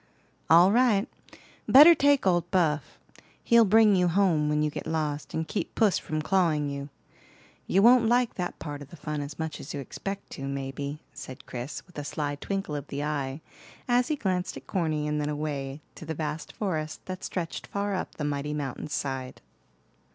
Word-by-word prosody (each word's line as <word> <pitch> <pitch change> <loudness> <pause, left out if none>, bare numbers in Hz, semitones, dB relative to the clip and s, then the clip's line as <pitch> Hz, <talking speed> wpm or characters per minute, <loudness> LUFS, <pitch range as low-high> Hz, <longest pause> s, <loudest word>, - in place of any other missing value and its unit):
"All 170 +4 +7
right. 235 -2 +3 0.6
Better 300 +6 +10
take 285 -4 +3
old 175 -2 +2
Buff; 160 -6 0 0.5
he'll 235 -1 +6
bring 215 0 +5
you 180 -1 +3
home 170 -4 +2
when 150 0 +1
you 150 - 0
get - - -6
lost, 150 -2 -2
and 160 0 -2
keep 210 - -4
puss 215 -5 +3
from 155 0 -3
clawing 160 -6 +1
you. 140 0 -5 0.8
You 195 +2 +3
won't 240 0 +6
like 245 0 +2
that 180 -1 -4
part 145 -2 -6
of 140 - -10
the - - -11
fun 150 -1 -4
as 145 0 -7
much 160 -2 -4
as 145 - -7
you - - -3
expect 195 +8 -6
to, 135 - -6
maybe," 140 +2 -5
said 130 +1 -10
Chris, 125 +3 -6
with 180 -5 -10
a - - -4
sly 145 0 -3
twinkle 195 +1 -3
of 145 -1 -5
the 140 +1 -4
eye, 145 -1 -3 0.5
as 245 0 +3
he 305 - 0
glanced 185 -7 -2
at - - -11
Corny 155 -5 -1
and 150 0 -1
then 145 - -2
away 145 -1 -4
to - - -10
the 160 - -3
vast 150 0 -4
forest 155 -7 -3
that 185 0 -6
stretched 170 -3 -4
far 200 0 -2
up 185 - -4
the 150 - -5
mighty 145 +1 -2
mountain's 145 +1 -4
side. 130 -2 -4
155 Hz, 190 wpm, -27 LUFS, 145-195 Hz, 0.8 s, Better